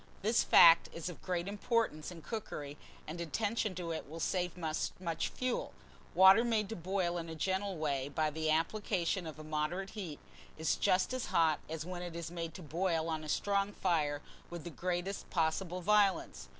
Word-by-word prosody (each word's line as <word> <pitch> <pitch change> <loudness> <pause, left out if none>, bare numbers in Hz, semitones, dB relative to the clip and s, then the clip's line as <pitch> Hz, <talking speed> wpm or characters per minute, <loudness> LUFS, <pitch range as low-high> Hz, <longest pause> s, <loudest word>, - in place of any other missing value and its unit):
This 225 +3 +3
fact 165 0 +8
is 165 +1 -4
of 175 - -10
great 180 -1 -2
importance 205 -5 0
in 170 -3 -10
cookery, 150 -10 -5 0.3
and 165 +3 -6
attention 205 +4 -1
to 170 -2 -4
it 160 -3 -5
will 165 +2 -7
save 180 0 -1
much 165 +1 -2
fuel. 255 -1 -2 0.4
Water 190 +4 +8
made 220 -4 +1
to 225 - -4
boil 175 -1 -1
in 165 0 -6
a 160 - -6
gentle 190 +3 -1
way 140 -3 -1
by 155 +1 0
the 155 +1 -1
application 175 +2 0
of 155 - -7
a 155 - -9
moderate 155 +5 -2
heat 180 -9 -6 0.4
is 160 0 +1
just 185 +7 +2
as 255 -2 -2
hot 160 -2 +3
as 160 0 -4
when 180 0 -5
it 175 -2 -6
is 170 0 -5
made 165 -2 -5
to 185 - -8
boil 165 +1 0
on 160 -1 -2
a 155 - -7
strong 200 +4 +1
fire 150 -7 0 0.3
with 175 -2 -7
the 170 - -6
greatest 180 +4 -3
possible 175 +2 0
violence. 200 - +2
175 Hz, 185 wpm, -34 LUFS, 160-195 Hz, 0.4 s, fact